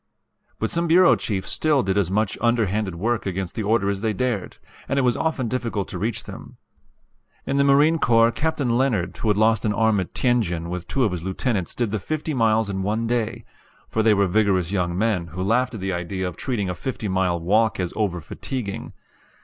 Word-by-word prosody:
But 110 - -2
some 170 0 0
bureau 175 +2 +6
chiefs 95 -4 -3
still 150 -4 +2
did 95 -1 0
as 100 -4 +1
much 105 +2 0
underhanded 110 -5 +1
work 110 +5 -1
against 95 -1 -3
the - - -3
order 105 -1 +1
as 100 -1 -1
they 110 -1 0
dared, 115 -3 -2 0.3
and 135 - 0
it 140 - +3
was 125 -2 +2
often 155 -6 -1
difficult 115 -5 -2
to 90 - -5
reach 110 +3 -2
them. - - -11 0.9
In 140 - -1
the 140 - +4
Marine 145 +4 +4
Corps 115 -3 +4
Captain 140 -5 0
Leonard, 105 -10 0
who - - -3
had 105 -1 +3
lost 110 0 +3
an 105 - +1
arm 110 -1 +2
at 90 - -5
Tientsin, 90 -10 0
with 90 0 -5
two 135 - 0
of 110 - +2
his 90 -2 -4
lieutenants 95 +1 -2
did 120 -4 -1
the 110 - -1
fifty 155 - -3
miles 110 -3 +2
in 95 -1 -3
one 110 +4 -1
day; 115 -1 -2 0.4
for 110 - 0
they 110 -1 +4
were 100 0 +3
vigorous 95 -2 +1
young 90 -3 -1
men, 100 -5 0
who 90 +4 -5
laughed 125 +4 +1
at 105 - -7
the 95 0 -2
idea 90 +2 -3
of 90 - -6
treating 115 -7 -2
a 90 - -2
fifty 115 +2 -4
mile 95 -2 +1
walk 105 +6 +2
as 90 -2 -2
over 100 -5 -1
fatiguing. 100 - -6
110 Hz, 215 wpm, -23 LUFS, 95-120 Hz, 0.9 s, bureau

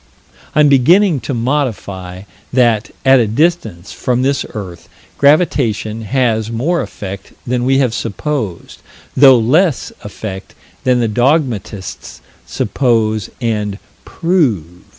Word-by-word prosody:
I'm 150 -1 +5
beginning 160 +5 +4
to - - 0
modify: 105 -8 -3 0.3
that, 120 -3 +2 0.2
at 135 0 +6
a 115 - +2
distance 110 - -1
from 125 0 -1
this 140 +1 0
earth, 90 -5 -8 0.3
gravitation 130 - +2
has 115 -2 0
more 145 +10 0
effect 95 -1 -8
than 125 0 -1
we 135 +1 +3
have 130 -4 +1
supposed, 115 - -4 0.4
though 135 -1 +7
less 150 +7 +1
effect 100 -2 -8 0.3
than 125 -1 +3
the 115 - +1
dogmatists 120 - -1 0.3
suppose 110 -5 0
and 105 -4 -2 0.3
"prove." 115 - -1
120 Hz, 110 wpm, -15 LUFS, 105-140 Hz, 0.4 s, though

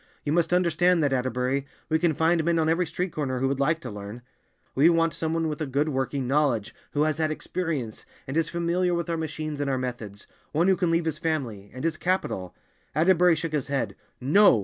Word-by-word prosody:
"You 145 - 0
must 170 0 +2
understand 180 -1 +3
that, 140 -2 +2
Atterbury! 130 +2 -1 0.2
We 160 0 +2
can 160 -2 +2
find 160 +1 +2
men 170 +1 +2
on 160 -1 +2
every 165 +2 +2
street 175 +2 -3
corner 135 -4 -2
who 135 +1 +1
would 135 0 -1
like 155 +4 +2
to 125 - -6
learn. 105 +4 -8 0.5
We 145 +5 +5
want 165 -2 +2
some 160 +1 -2
one 165 0 0
with 155 0 -4
a 155 - -1
good 140 +4 0
working 135 -1 -1
knowledge, 135 -6 +1 0.2
who 145 - +2
has 155 0 0
had 155 -1 +2
experience, 155 -7 -3 0.2
and 135 - -5
is 160 -1 +1
familiar 175 +1 0
with 170 0 -2
our - - 0
machines 155 -2 -4
and 140 - -1
our 135 - +1
methods—one 125 - -4
who 190 - +5
can 180 -2 0
leave 165 0 +1
his 155 -2 -2
family—and 130 - -3
has 160 -1 0
capital—" 180 - -2 0.4
Atterbury 175 +1 +5
shook 160 0 -3
his 150 -4 -1
head. 120 -8 -1 0.2
"No! 150 +12 +4
155 Hz, 215 wpm, -26 LUFS, 135-165 Hz, 0.5 s, We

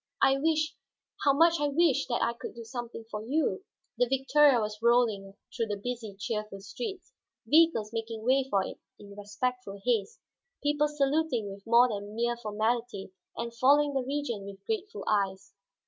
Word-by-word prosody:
I 270 0 +4
wish, 310 0 +1 0.5
how 280 - +5
much 330 +3 +4
I 295 - +1
wish, 300 0 +2
that 240 -2 0
I 235 - +1
could 235 - -8
do 235 - -8
something 235 -1 -7
for 210 0 -4
you!" 300 - 0 0.4
The 245 - +4
victoria 270 +1 +4
was 210 0 -4
rolling 225 -5 +2 0.2
through 230 -3 -1
the 205 -1 -3
busy, 225 -1 -5
cheerful 210 -1 -4
streets; 385 - -7 0.3
vehicles 300 -9 +3
making 225 -1 -4
way 265 +1 +3
for 195 -4 +2
it - - -7 0.2
in 200 -1 -13
respectful 205 +1 -4
haste, 225 -5 0 0.4
people 295 +1 +2
saluting 285 -6 0
with 200 +2 -14
more 235 +2 +6
than 205 -2 -5
mere 240 +1 0
formality 220 -2 -2 0.3
and 235 0 -4
following 285 +4 +4
the 270 - +1
Regent 260 -5 -3
with 195 -1 -11
grateful 435 -1 -3
eyes. 195 -2 -1
235 Hz, 165 wpm, -29 LUFS, 210-280 Hz, 0.5 s, more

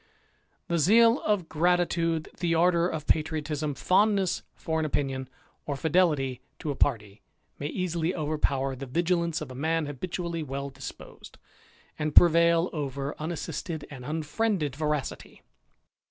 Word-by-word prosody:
The 170 -1 0
zeal 230 - +5
of 205 -6 0
gratitude, 165 -1 +1
the 170 -1 +1
ardour 170 0 +3
of 160 -4 -4
patriotism, 155 -2 0
fondness 195 - +2
for 160 -1 -2
an 160 - 0
opinion, 135 -3 -2 0.4
or 145 - -1
fidelity 150 -5 +1 0.2
to 155 - -3
a - - -4
party, 110 -7 -1 0.4
may 145 - -2
easily 170 0 -1
overpower 145 -4 0
the 135 +1 -7
vigilance 170 +3 0
of 150 - -6
a - - -7
mind 160 +4 0
habitually 170 +4 -4
well 140 -1 -4
disposed, 135 0 -10 0.6
and 150 -1 -2
prevail 170 0 +6
over 140 -2 -3
unassisted 160 0 -4
and 130 -3 -8
Unfriended 155 - -1
veracity. 150 -1 -3
160 Hz, 130 wpm, -28 LUFS, 145-170 Hz, 0.6 s, prevail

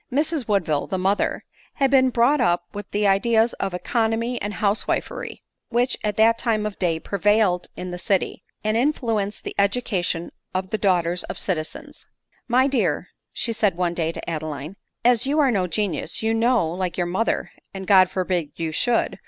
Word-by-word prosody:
Mrs 295 0 0
Woodville, 170 -9 +1
the 190 - -2
mother, 190 +2 0 0.3
had 275 -2 +2
been 260 -1 +5
brought 250 +4 +3
up 175 -6 +2
with 205 -1 -6
all - - -43
the 205 0 0
ideas 225 +4 +3
of 195 -2 -2
economy 230 +4 -1
and 205 +1 -3
housewifery 205 +1 -2 0.3
which 245 +2 +1
at 210 -1 -1
that 230 +1 +4
time 220 -3 0
of 210 -2 -5
day 165 -3 +1
prevailed 200 -1 +1
in 180 0 -5
the 180 - -5
city, 195 0 -1 0.2
and 215 0 0
influenced 230 -6 0
the - - -5
edu 200 +5 +2
cation 175 -4 -2 0.2
of 185 0 -2
the 215 - -1
daughters 180 -3 +1
of - - -6
citizens. 160 -5 -5 0.2
" - - -40
My 250 +2 +4
dear," 195 - 0 0.3
said 220 -4 +1
she - - -19
one 175 -1 0
day 165 -1 -1
to - - -8
Adeline, 155 0 -4 0.2
" - - -46
as 245 0 +4
you 290 +2 +1
are 280 -4 +4
no 190 -5 +1
genius, 180 -1 -2
you 225 0 +2
know, 230 -4 +2
like 180 +1 -3
your 175 - +1
mother, 185 +6 -1 0.2
(and 190 -1 -7
God 185 -2 +6
forbid 180 -5 -2
you 165 -1 -3
should 235 +8 +1
205 Hz, 190 wpm, -23 LUFS, 180-230 Hz, 0.3 s, God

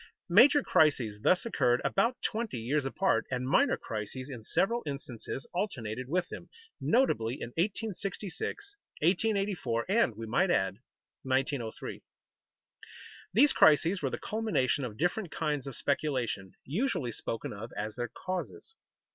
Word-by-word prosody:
Major 260 +10 +7
crises 135 - +3
thus 185 - +3
occurred 125 - +2
about 230 +6 +2
twenty 225 - -2
years 130 +5 0
apart, 190 +8 +1
and 125 0 -2
minor 135 - +3
crises 115 +5 -5
in 120 -4 -8
several 230 - +1
instances 135 -2 -5
alternated 130 - -3
with 180 +3 +1
them, - - -8 0.3
notably 130 - +2
in 120 - -6
1866, 200 - -3 0.3
1884, 195 - +1
and 195 - +2
we 115 - -5
might 135 - +2
add, 95 - +1 0.4
1903. 130 -3 -2 1.3
These 275 +9 +5
crises 160 +5 +5
were - - 0
the - - -3
culmination 215 - 0
of 110 -3 -7
different 175 +4 0
kinds 150 -4 -2
of 135 - -5
speculation, 125 -9 -1
usually 155 - -1
spoken 115 0 -4
of 110 +4 -8
as 105 +1 -3
their 120 -1 -3
causes. 185 - -5
145 Hz, 130 wpm, -30 LUFS, 120-195 Hz, 1.3 s, Major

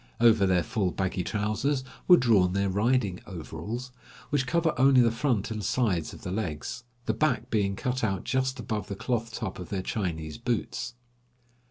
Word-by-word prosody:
Over 115 -4 +5
their 90 -2 +3
full 110 -6 0
baggy 95 0 -1
trousers 110 +8 0 0.2
were 180 - +9
drawn 100 -7 +4
their 100 0 +1
riding 105 -1 +1
overalls, 100 +8 -6 0.4
which 135 -3 +1
cover 165 +1 +2
only 130 +1 +5
the 120 -2 +5
front 115 -3 0
and 110 -2 -3
sides 110 -8 +1
of - - -12
the 90 - -4
legs, 110 +5 -4 0.2
the 110 - +1
back 125 -1 0
being 100 -3 +1
cut 125 +4 -2
out 100 -3 0
just 130 0 0
above 105 -3 -3
the 100 - -4
cloth 115 +1 -2
top 110 -4 -4
of 90 - -7
their 95 -2 -2
Chinese 80 -9 -3
boots. - - -2
110 Hz, 175 wpm, -28 LUFS, 95-125 Hz, 0.4 s, were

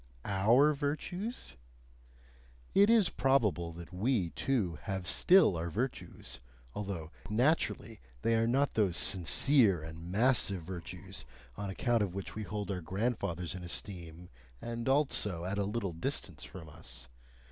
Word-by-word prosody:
OUR 115 +10 +4
Virtues? 160 - -4 1.2
It 200 +2 +6
is 225 -5 +5
probable 105 -11 +2
that 85 +2 -10
we, 100 -3 0
too, 105 - -1
have 95 -2 -3
still 175 - +5
our 85 +1 -2
virtues, 120 - -5 0.3
although 95 -6 -5 0.2
naturally 115 -2 +1 0.2
they 115 - +3
are 115 0 +3
not 135 +4 +2
those 100 -6 +1
sincere 95 - +3
and 80 +2 -8
massive 105 -4 +2
virtues 85 0 -7 0.3
on 100 - -4
account 115 +4 +1
of 95 -3 -1
which 100 - -5
we 110 - -5
hold 105 -1 -4
our 90 -2 -3
grandfathers 95 -2 -2
in 90 -1 -7
esteem 85 -1 -5 0.3
and 120 +1 -4
also 105 - +1
at 100 +2 -2
a 100 - +1
little 100 -3 -2
distance 80 - -4
from 85 -4 -9
us. 65 -5 -10
100 Hz, 135 wpm, -32 LUFS, 85-125 Hz, 1.2 s, It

